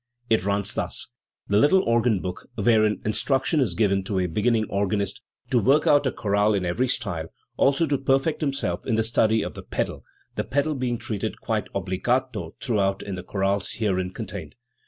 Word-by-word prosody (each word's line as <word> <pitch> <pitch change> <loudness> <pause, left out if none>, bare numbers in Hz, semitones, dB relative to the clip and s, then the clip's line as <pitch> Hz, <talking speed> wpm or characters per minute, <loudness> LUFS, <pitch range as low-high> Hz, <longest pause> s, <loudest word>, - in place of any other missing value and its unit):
It 110 -5 +4
runs 100 +1 0
thus: - - -4 0.4
"The 100 0 +3
Little 185 - +5
Organ 115 -4 +2
Book, 90 -1 -6
wherein 110 -1 +3
instruction 135 +7 +1
is 110 -11 +1
given 100 -3 +2
to 100 -1 -2
a 90 - +2
beginning 110 +6 +1
organist 100 0 -1 0.3
to 125 - +4
work 140 +7 +3
out 145 -2 +4
a - - +1
chorale 105 0 +1
in 95 -2 -1
every 110 +9 0
style, 100 -11 -2 0.3
also 140 +4 +3
to 140 -3 0
perfect 135 +4 +1
himself 140 -2 -1
in 120 - +2
the 110 - +2
study 110 -1 +2
of - - -5
the - - -8
pedal, - - -3 0.3
the - - -2
pedal 145 +3 0
being 125 -3 -1
treated 105 -3 -4
quite - - -2
obbligato 110 +8 -1
throughout 100 -6 0
in 100 - -5
the 90 - -4
chorales 95 +1 -1
herein 95 -4 -1
con 110 - -5
tained. 90 -7 -7
110 Hz, 185 wpm, -25 LUFS, 100-130 Hz, 0.4 s, Little